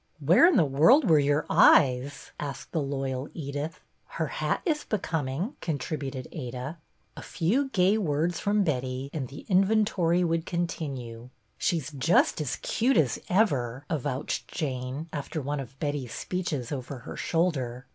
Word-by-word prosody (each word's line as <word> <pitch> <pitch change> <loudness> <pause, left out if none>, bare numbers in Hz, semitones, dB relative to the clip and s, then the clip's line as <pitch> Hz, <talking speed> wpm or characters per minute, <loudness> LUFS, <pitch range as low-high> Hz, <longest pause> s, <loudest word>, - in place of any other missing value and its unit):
" - - -39
Where 165 - +6
in 365 - +4
the 165 - +5
world 160 - +5
were 160 -3 +6
your 145 +1 +2
eyes? 130 +1 +4
" - - -37
asked 140 -2 -6
the 160 - 0
loyal 135 -1 -3
Edith. 145 +1 -5 0.2
" - - -44
Her - - +1
hat - - -2
is 305 -4 0
becoming," 165 - -2
contributed 140 -3 -4
Ada. 130 +1 -6 0.4
A - - -8
few 245 - 0
gay 200 -1 +3
words 165 -1 0
from 205 0 +2
Betty 130 -3 -2
and 140 -5 -3
the 135 - -11
in 190 -2 +5
ventory 190 -5 +2
would 165 0 -1
continue. 135 -9 -4 0.3
"She's 155 -4 0
just 155 +3 +2
as 145 - -2
cute 250 +4 +2
as 140 -6 +2
ever," 140 - +1
avouched 140 -3 -2
Jane, 130 +1 -4
after 145 +1 -4
one 145 +1 -3
of 135 0 -8
Betty's 145 -6 -3
speeches 165 -9 -3
over 135 -1 -5
her - - -7
shoulder. 135 -8 -1
150 Hz, 160 wpm, -27 LUFS, 135-175 Hz, 0.4 s, Where